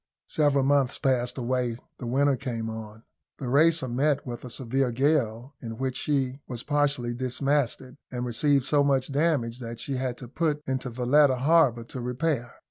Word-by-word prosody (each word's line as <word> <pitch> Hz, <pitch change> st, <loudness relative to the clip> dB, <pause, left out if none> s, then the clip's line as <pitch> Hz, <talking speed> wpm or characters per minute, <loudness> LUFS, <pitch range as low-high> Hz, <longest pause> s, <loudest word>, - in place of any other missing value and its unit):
Several 145 Hz, -3 st, +2 dB
months 140 Hz, -2 st, +2 dB
passed 125 Hz, -1 st, 0 dB
away 125 Hz, -1 st, -1 dB, 0.2 s
the 125 Hz, -, -5 dB
winter 140 Hz, +3 st, +2 dB
came 115 Hz, -4 st, -4 dB
on. 110 Hz, 0 st, -9 dB, 0.3 s
The 130 Hz, -, -5 dB
Racer 155 Hz, +1 st, +4 dB
met 140 Hz, +4 st, 0 dB
with 120 Hz, -2 st, -6 dB
a 125 Hz, -, -7 dB
severe 130 Hz, +1 st, -1 dB
gale, 130 Hz, -1 st, 0 dB
in 115 Hz, -2 st, -6 dB
which 130 Hz, 0 st, -2 dB
she 135 Hz, -2 st, -1 dB
was 120 Hz, -2 st, -5 dB
partially 145 Hz, -5 st, +1 dB
dismasted, 130 Hz, +1 st, -1 dB
and 125 Hz, -1 st, -3 dB
received 135 Hz, +3 st, +2 dB
so 145 Hz, 0 st, +3 dB
much 135 Hz, -1 st, +1 dB
damage 140 Hz, -6 st, 0 dB
that 115 Hz, -2 st, -7 dB
she 135 Hz, +2 st, -3 dB
had 125 Hz, -1 st, -2 dB
to 125 Hz, -, -9 dB
put 150 Hz, +2 st, -1 dB
into 130 Hz, -1 st, -2 dB
Valetta 130 Hz, +3 st, +3 dB
harbour 135 Hz, -3 st, +3 dB
to 125 Hz, +2 st, -7 dB
repair. 125 Hz, 0 st, -1 dB
130 Hz, 170 wpm, -27 LUFS, 120-145 Hz, 0.3 s, Racer